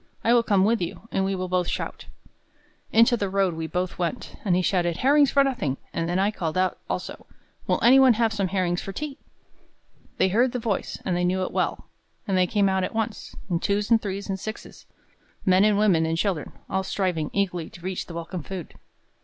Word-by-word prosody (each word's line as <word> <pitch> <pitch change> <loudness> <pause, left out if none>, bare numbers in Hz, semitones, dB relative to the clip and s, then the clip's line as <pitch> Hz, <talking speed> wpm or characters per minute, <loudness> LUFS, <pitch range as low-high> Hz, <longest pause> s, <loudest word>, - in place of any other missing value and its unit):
"I 230 - +4
will 240 - +6
come 200 -4 +2
with 225 0 +2
you, 175 +5 -5
and 195 - +1
we 195 0 0
will 185 0 -3
both 180 -1 0
shout." - - -4 0.8
Into 230 +2 +5
the 200 -4 -2
road 195 -2 +1
we 160 0 -4
both 180 +1 -3
went; 175 +7 -3
and 190 -5 +2
he 180 - +1
shouted, 175 -2 +1
"Herrings 285 +3 +4
for 280 - +4
nothing!" 195 - -1 0.2
and 165 0 -2
then 175 - 0
I 200 +2 +2
called 165 -5 -3
out 185 0 +1
also, - - -5 0.4
"Will - - +2
any 255 +3 +7
one 260 -2 +7
have 225 0 +1
some 200 -2 0
herrings 180 -2 0
for 195 - -6
tea?" 290 +5 -5 1.0
They 190 - +3
heard 240 +6 +2
the - - -1
voice, 220 -4 -2
and 185 - 0
they 180 - 0
knew 185 +1 +1
it - - -3
well; - - -1 0.4
and 195 - +1
they 185 -1 +3
came 200 +1 +2
out 190 -1 +1
at 185 - -4
once, 225 0 -3
in 175 -4 0
twos 205 +4 -1
and 225 -1 +5
threes 200 0 -4
and 195 -1 -3
sixes, 215 +3 -8 0.6
men 185 +1 +5
and 210 -1 +4
women 185 -6 +3
and 165 0 -1
children, 180 -4 -1 0.2
all 190 - 0
striving 185 -5 -1
eagerly 180 -5 -1
to 175 - -14
reach 185 +1 -4
the 170 - -8
welcome 170 +1 -5
food. 180 +1 -7
190 Hz, 220 wpm, -25 LUFS, 180-215 Hz, 1.0 s, any